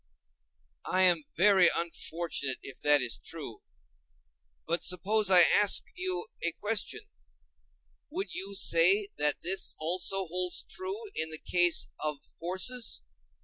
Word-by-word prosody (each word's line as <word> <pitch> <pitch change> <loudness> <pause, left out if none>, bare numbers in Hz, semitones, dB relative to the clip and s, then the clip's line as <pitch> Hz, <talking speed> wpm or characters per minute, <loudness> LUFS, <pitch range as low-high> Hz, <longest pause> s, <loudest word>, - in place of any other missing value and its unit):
I 185 0 +2
am 175 -5 +3
very 190 -1 +5
unfortunate 165 -4 -3
if 135 - -11
that 145 -1 +3
is 120 -2 -2
true. 145 -9 -8 1.0
But 170 +1 -1
suppose 200 +3 +1
I 180 -2 +8
ask 205 +4 +6
you 375 +1 -4 0.2
a 170 - -1
question: 210 - -2 1.1
Would 365 +6 -6
you 195 +1 -5
say 190 +2 +2
that 150 -1 +1
this 190 +3 +1
also 185 +4 0
holds 180 +1 -4
true 390 +4 -6
in 160 - 0
the 155 - -3
case 175 +1 +1
of 150 -1 -2 0.2
horses? 185 - -1
180 Hz, 125 wpm, -28 LUFS, 165-205 Hz, 1.1 s, I